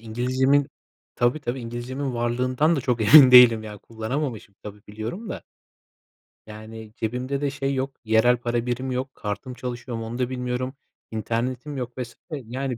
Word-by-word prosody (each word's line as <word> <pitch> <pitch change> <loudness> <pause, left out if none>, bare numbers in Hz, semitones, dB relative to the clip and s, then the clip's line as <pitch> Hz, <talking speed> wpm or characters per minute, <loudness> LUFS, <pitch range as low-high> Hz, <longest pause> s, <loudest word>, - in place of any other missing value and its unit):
İngilizcemin 130 +5 +1 0.5
Tabii, 120 +5 +1
tabii. 130 -2 -3
İngilizcemin 125 +3 -4
varlığından 125 +7 +1
da 140 - 0
çok 125 -2 -1
emin 135 -4 +11
değilim, 120 -3 +8
ya, 105 -1 -8
kullanamamışım, 115 -1 -5
tabii, 105 0 -9
biliyorum 115 - -6
da - - -6 1.0
yani, 110 0 -10
cebimde 125 +5 -3
de 145 - +1
şey 135 0 -2
yok, 135 +1 -3
yerel 110 +3 +4
para 120 0 -2
birimi 125 +1 -2
yok, 130 +1 -4
kartım 110 +5 -5
çalışıyor 120 -1 -5
mu, 115 - -5
onu 120 +2 -5
da 125 -1 0
bilmiyorum, 125 +1 -3 0.4
internetim 120 +6 -3
yok 125 -1 -5
vs. 120 -2 -6 0.2
yani 130 -2 -4
125 Hz, 155 wpm, -24 LUFS, 115-130 Hz, 1.0 s, emin